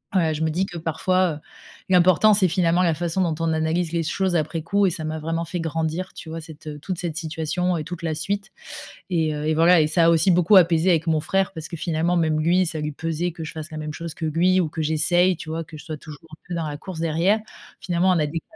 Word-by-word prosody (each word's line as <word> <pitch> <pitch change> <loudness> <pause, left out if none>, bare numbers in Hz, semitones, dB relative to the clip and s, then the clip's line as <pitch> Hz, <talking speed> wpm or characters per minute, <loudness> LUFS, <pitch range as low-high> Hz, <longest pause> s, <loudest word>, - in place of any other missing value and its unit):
ouais, 165 -4 +2
je 155 +1 -2
me 160 - +1
dis 180 +5 0
que, 175 -3 -7
parfois, 175 +2 +1
heu, - - -8 0.5
l'important 185 +3 +5
c'est, 200 -2 +3
finalement, 175 0 +2
la 170 -3 +2
façon 175 +3 -1
dont 170 -3 0
on 160 - +1
analyse 160 +1 0
les 170 0 0
choses 185 +3 -1
après 160 0 -1
coup 200 +4 +2
et - - +3
ça 170 -2 -5
m'a 155 0 -3
vraiment 165 +2 -2
fait 175 +2 -4
grandir, 165 +3 -3
tu 160 - -9
vois, 165 +1 -5
cette, 160 -1 -13
heu, 150 -1 -7
toute 180 +4 -4
cette 170 -3 -4
situation 165 +2 -1
et 155 - -3
toute 175 +2 -7
la 160 -2 -2
suite 200 +6 -3 0.6
et 160 -3 +1
heu, 150 0 -4
et 155 - +2
voilà, 165 +2 +5
et 155 - +4
ça 165 +2 +3
a - - +6
aussi 165 +3 +4
beaucoup 180 +3 +4
apaisé 170 -1 +5
avec 165 -2 +2
mon 160 -2 +2
frère, 195 +5 0
parce 160 -3 -7
que, 170 - -7
finalement, 170 +2 0
même 160 -2 +1
lui, 180 +4 +3
ça 160 -2 -4
lui 150 0 -3
pesait 165 +3 -2
que 165 0 -8
je 155 - -6
fasse 155 0 -7
la 155 - -8
même 155 0 -5
chose 165 -1 -7
que 165 - -4
lui 175 +4 +2
ou 170 -4 0
que 160 - -4
j'essaye, 165 +3 +2
tu 160 - -8
vois, 165 +1 -3
que 155 0 -12
je 150 - -11
sois 155 -2 -5
toujours 155 +2 -12
un 155 - -11
peu 175 - -4
dans 165 -2 -2
la 145 -1 -5
course 175 +1 -8
derrière. 170 +6 +2 0.4
Finalement, 175 +1 +1
on 180 - +4
a 150 - +2
des 155 +3 -3
carrières - - -28
165 Hz, 275 wpm, -23 LUFS, 155-180 Hz, 0.6 s, a